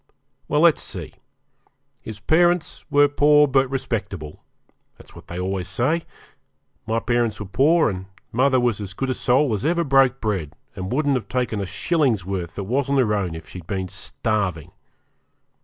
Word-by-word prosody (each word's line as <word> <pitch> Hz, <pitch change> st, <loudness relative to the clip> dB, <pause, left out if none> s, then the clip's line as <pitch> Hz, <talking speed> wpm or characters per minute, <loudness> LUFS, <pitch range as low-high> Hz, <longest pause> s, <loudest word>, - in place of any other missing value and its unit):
Well, 150 Hz, +1 st, +1 dB
let's 170 Hz, -2 st, +5 dB
see; -, -, -6 dB, 0.9 s
his 110 Hz, -2 st, -8 dB
parents 175 Hz, -, +1 dB
were 145 Hz, 0 st, +5 dB
poor, 150 Hz, +1 st, +4 dB
but 135 Hz, -1 st, +2 dB
respectable. 100 Hz, -, -4 dB, 0.5 s
That's -, -, -16 dB
what -, -, -14 dB
they 85 Hz, -, -7 dB
always 95 Hz, 0 st, -2 dB
say. 130 Hz, -, 0 dB, 0.8 s
My 110 Hz, +1 st, 0 dB
parents 120 Hz, -2 st, 0 dB
were 105 Hz, -, -5 dB
poor, 150 Hz, -, +3 dB
and 95 Hz, -2 st, -4 dB, 0.2 s
mother 130 Hz, +2 st, +3 dB
was 120 Hz, -4 st, 0 dB
as 95 Hz, -2 st, -7 dB
good 135 Hz, +2 st, -2 dB
a -, -, +1 dB
soul 130 Hz, +1 st, +2 dB
as 105 Hz, -, -2 dB
ever 170 Hz, +3 st, +1 dB
broke 135 Hz, -2 st, +3 dB
bread, 95 Hz, -9 st, -2 dB, 0.2 s
and 95 Hz, +1 st, -5 dB
wouldn't 145 Hz, +2 st, +1 dB
have 130 Hz, -4 st, -2 dB
taken 125 Hz, -5 st, -1 dB
a 95 Hz, -, -3 dB
shilling's 130 Hz, -, +1 dB
worth 90 Hz, -3 st, -4 dB
that 100 Hz, -, -4 dB
wasn't 140 Hz, +6 st, 0 dB
her 115 Hz, -5 st, +2 dB
own 95 Hz, -5 st, -1 dB
if 80 Hz, -, -9 dB
she'd 90 Hz, -3 st, -10 dB
been 95 Hz, -2 st, -3 dB
starving. 95 Hz, -2 st, -3 dB
120 Hz, 170 wpm, -22 LUFS, 95-140 Hz, 0.9 s, let's